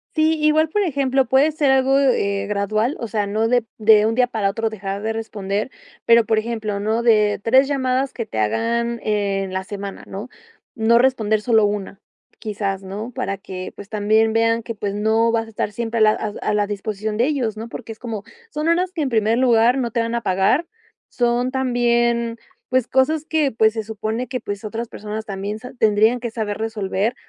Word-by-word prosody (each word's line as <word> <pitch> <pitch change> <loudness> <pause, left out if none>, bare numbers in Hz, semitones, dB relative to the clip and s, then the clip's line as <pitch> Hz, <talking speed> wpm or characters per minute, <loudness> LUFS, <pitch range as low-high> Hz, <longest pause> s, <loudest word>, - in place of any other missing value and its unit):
Sí, 315 0 +2
igual, 305 +1 +3
por 415 +5 0
ejemplo, 270 -4 +1
puede 270 +6 +3
ser 290 -3 +2
algo, 265 +1 +3
eh, 200 -7 +1
gradual, 215 +5 0
o 235 - -4
sea, 210 -1 -1
no 220 +3 0
de 245 -1 +2
de 215 -1 +5
un 225 - +1
día 250 0 +3
para 215 -5 0
otro 225 +2 -1
dejar 200 -2 -5
de 220 +1 -2
responder, 210 0 -3 0.3
pero, 230 -1 +5
por 220 -1 +1
ejemplo, 215 -2 -2
¿no?, 220 +2 0
de 210 -3 +3
3 260 +4 +4
llamadas 265 -1 0
que 230 - -4
te 110 - -8
hagan 235 - 0
en 200 -2 -1
la 190 - -2
semana, 200 0 -7
¿no?, 200 +5 -6 0.5
no 230 0 +4
responder 225 -4 +2
solo 225 -1 +3
una, 205 -1 -4 0.4
quizás, 200 -2 -3
¿no?, 210 +6 -6
para 195 - -2
que, 185 -1 -7
pues, 200 - -10
también 220 +1 +2
vean 230 0 +2
que, 230 0 -6
pues 205 -1 -3
no, 220 +2 +2
vas 225 -1 0
a - - -11
estar 210 -1 -3
siempre 230 +1 -3
a - - +1
la 215 0 +6
a 215 - -2
a - - 0
la 205 -1 +1
disposición 210 +1 -4
de 240 - +3
ellos, 250 -8 -1
¿no?, 225 +2 -7
porque 225 - -7
es - - -21
como, 225 -4 -5 0.3
son 305 -2 -3
horas 360 +2 +2
que 335 - -4
en 265 - -1
primer 225 0 +2
lugar, 245 0 +4
no 240 -4 -1
te 235 - 0
van 230 +1 -2
a 235 - -1
pagar, 195 - +1 0.4
son 245 +1 0
también, 240 -2 +1 0.3
pues, 255 -2 +1
cosas 290 +4 +2
que, 310 -4 +1
pues, 220 -1 +4
se 220 -1 -3
supone 220 +3 -4
que 255 +1 -4
pues 205 +2 -6
otras 225 +2 -4
personas 215 +1 -6
también 200 +1 -4
se 250 +1 -10
tendrían 220 +1 +3
que 235 -2 -4
saber 215 -3 -3
resolver. 220 0 -2
225 Hz, 205 wpm, -21 LUFS, 210-245 Hz, 0.5 s, la